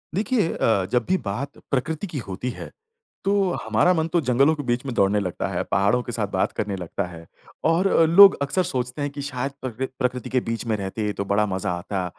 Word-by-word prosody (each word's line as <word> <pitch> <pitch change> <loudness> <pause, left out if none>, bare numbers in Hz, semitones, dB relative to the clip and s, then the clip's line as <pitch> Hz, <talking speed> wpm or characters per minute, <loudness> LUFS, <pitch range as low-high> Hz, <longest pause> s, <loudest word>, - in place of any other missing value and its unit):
देखिए 215 -3 +1
अ, 100 -5 +1
जब 125 -1 +1
भी 190 - +3
बात 120 +8 -4
प्रकृति 155 +8 -1
की 160 - -6
होती 100 +6 -4
है, - - -9 0.5
तो 200 - +2 0.3
हमारा 110 +11 +3
मन 160 -2 0
तो 175 - +4
जंगलों 135 +3 +3
के 145 - -5
बीच 120 +1 -1
में 130 - -3
दौड़ने 100 0 +3
लगता 90 -3 -3
है, - - -2
पहाड़ों 100 +5 +2
के 120 - -6
साथ 110 -3 -2
बात 95 -1 0
करने 105 -2 -2
लगता 90 -2 -4
है 85 -2 -11 0.4
और 165 +4 +3
अ, 165 - +4
लोग 195 +5 +8
अक्सर 140 +7 +1
सोचते 125 -4 -3
हैं 145 - -1
कि 140 0 -6
शायद 135 -1 -3
प्रकृ 130 0 -3
प्रकृति 125 -2 -1
के 130 - +2
बीच 115 +1 -3
में 110 -2 0
रहते 105 +2 -3
तो 100 - -4
बड़ा 100 +2 +2
मज़ा 95 -3 -2
आता। 95 +1 -3
125 Hz, 220 wpm, -23 LUFS, 100-145 Hz, 0.5 s, लोग